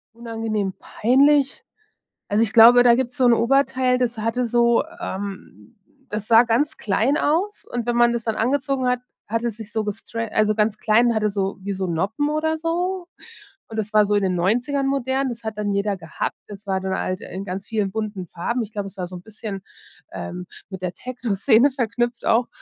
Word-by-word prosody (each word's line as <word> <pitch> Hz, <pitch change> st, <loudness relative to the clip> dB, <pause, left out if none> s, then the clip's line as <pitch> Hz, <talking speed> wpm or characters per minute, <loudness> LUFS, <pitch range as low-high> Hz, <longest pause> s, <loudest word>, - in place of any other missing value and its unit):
Unangenehm 225 Hz, -4 st, -3 dB
peinlich? 275 Hz, +4 st, +2 dB, 0.6 s
Also, 210 Hz, +2 st, +2 dB
ich 215 Hz, -, -3 dB
glaube, 235 Hz, +2 st, +9 dB
da 240 Hz, -1 st, +6 dB
gibt's 245 Hz, -1 st, -2 dB
so 255 Hz, -, +3 dB
'n 240 Hz, -, +6 dB
Oberteil, 255 Hz, +1 st, +2 dB
das 245 Hz, -2 st, -1 dB
hatte 230 Hz, +3 st, -1 dB
so, 235 Hz, 0 st, +3 dB, 0.2 s
ähm 190 Hz, -, -7 dB, 0.3 s
das 210 Hz, 0 st, -4 dB
sah 230 Hz, +1 st, +7 dB
ganz 280 Hz, +7 st, 0 dB
klein 230 Hz, +8 st, +1 dB
aus 350 Hz, +9 st, 0 dB
und 240 Hz, -1 st, -3 dB
wenn 240 Hz, -, +1 dB
man 240 Hz, 0 st, +4 dB
das 235 Hz, -1 st, -2 dB
dann 225 Hz, -2 st, -1 dB
angezogen 270 Hz, +2 st, 0 dB
hat, 250 Hz, 0 st, +1 dB, 0.3 s
hat 230 Hz, +2 st, -1 dB
es 235 Hz, -3 st, -2 dB
sich 220 Hz, -2 st, -9 dB
so 220 Hz, 0 st, -1 dB
gestre 220 Hz, +2 st, -5 dB
also 215 Hz, 0 st, +2 dB
ganz 215 Hz, 0 st, +1 dB
klein 220 Hz, +3 st, +3 dB
und 235 Hz, -, +1 dB
hatte 215 Hz, -1 st, +1 dB
so, 195 Hz, -1 st, -2 dB
wie 200 Hz, 0 st, -2 dB
so 190 Hz, -1 st, -3 dB
Noppen 200 Hz, -, -1 dB
oder 315 Hz, +1 st, 0 dB
so 350 Hz, +2 st, -2 dB, 0.6 s
und 225 Hz, -, -8 dB
das 215 Hz, 0 st, -3 dB
war 210 Hz, -1 st, +5 dB
so 210 Hz, -, 0 dB
in 205 Hz, -, +3 dB
den 185 Hz, -2 st, 0 dB
90ern 245 Hz, +10 st, +1 dB
modern, 270 Hz, 0 st, 0 dB
das 235 Hz, -1 st, -7 dB
hat 220 Hz, -1 st, -5 dB
dann 205 Hz, -1 st, -1 dB
jeder 200 Hz, 0 st, 0 dB
gehabt. 165 Hz, -3 st, -4 dB
Das 205 Hz, 0 st, -11 dB
war 190 Hz, -1 st, 0 dB
dann 190 Hz, 0 st, -2 dB
halt 185 Hz, 0 st, -3 dB
in 190 Hz, +2 st, -7 dB
ganz 190 Hz, +1 st, -5 dB
vielen 210 Hz, -3 st, -1 dB
bunten 210 Hz, -4 st, -4 dB
Farben. 235 Hz, +10 st, -2 dB
Ich 215 Hz, -, -10 dB
glaube, 205 Hz, -2 st, -4 dB
es 195 Hz, -, -17 dB
war 180 Hz, -, -3 dB
so 180 Hz, -, -10 dB
'n 180 Hz, -, -9 dB
bisschen, 210 Hz, -3 st, -7 dB, 0.5 s
ähm, 180 Hz, 0 st, -6 dB, 0.2 s
mit 190 Hz, -2 st, -8 dB
der 180 Hz, -1 st, -2 dB
Techno 250 Hz, -3 st, -4 dB
Szene 240 Hz, +6 st, +4 dB
verknüpft 240 Hz, -1 st, -2 dB
auch 235 Hz, +2 st, +3 dB
225 Hz, 205 wpm, -22 LUFS, 205-250 Hz, 0.6 s, glaube